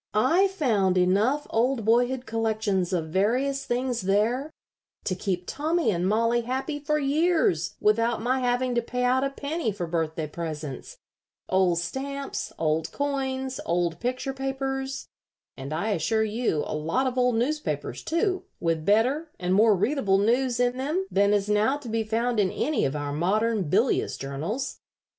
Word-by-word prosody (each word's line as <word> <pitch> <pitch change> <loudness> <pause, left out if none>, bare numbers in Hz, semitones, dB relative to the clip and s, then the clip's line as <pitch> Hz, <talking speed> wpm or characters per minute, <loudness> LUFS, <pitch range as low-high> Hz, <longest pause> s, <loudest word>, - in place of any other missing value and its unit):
"I 340 - +4
found 220 - +1
enough 210 +11 +2
old 235 0 +1
boyhood 245 +3 +2
collections 220 -5 0
of 165 -4 -1
various 250 - +1
things 245 -1 -1
there 220 +9 +1 0.5
to 185 - -1
keep 185 -1 -2
Tommy 310 - 0
and 180 0 0
Mollie 230 +2 +2
happy 265 +5 -3
for 300 +1 0
years 295 - +1
without 230 +2 +2
my 250 +4 0
having 250 0 0
to 240 - +2
pay 250 +2 -3
out 255 +1 +3
a 275 - +1
penny 285 -2 -2
for 190 -3 -4
birthday 160 -1 -2
presents 150 -3 -6 0.5
old 185 -2 +3
stamps, 275 +9 -4
old 160 0 0
coins, 265 -2 -2
old 170 -1 0
picture 255 +2 -2
papers, 270 0 -3 0.5
and, 135 +1 -7
I 170 +8 -1
assure 210 +3 +1
you, 215 -8 0
a - - -4
lot 160 - 0
of 255 -1 -1
old 250 -2 +2
newspapers, 300 +7 -2
too, 370 +3 0
with 165 -2 0
better 250 - +2
and 180 0 0
more 215 +2 +5
readable 205 -1 +2
news 240 +4 +2
in 245 0 +1
them 305 +9 -1
than 200 +1 +3
is 205 -1 +2
now 210 +6 +2
to 290 -4 -11
be 225 0 0
found 230 +2 0
in 195 -2 +3
any 305 +9 0
of 135 +1 -1
our 145 -1 -3
modern 200 +3 +1
bilious 220 - +1
journals. 160 - -4
230 Hz, 160 wpm, -26 LUFS, 190-265 Hz, 0.5 s, more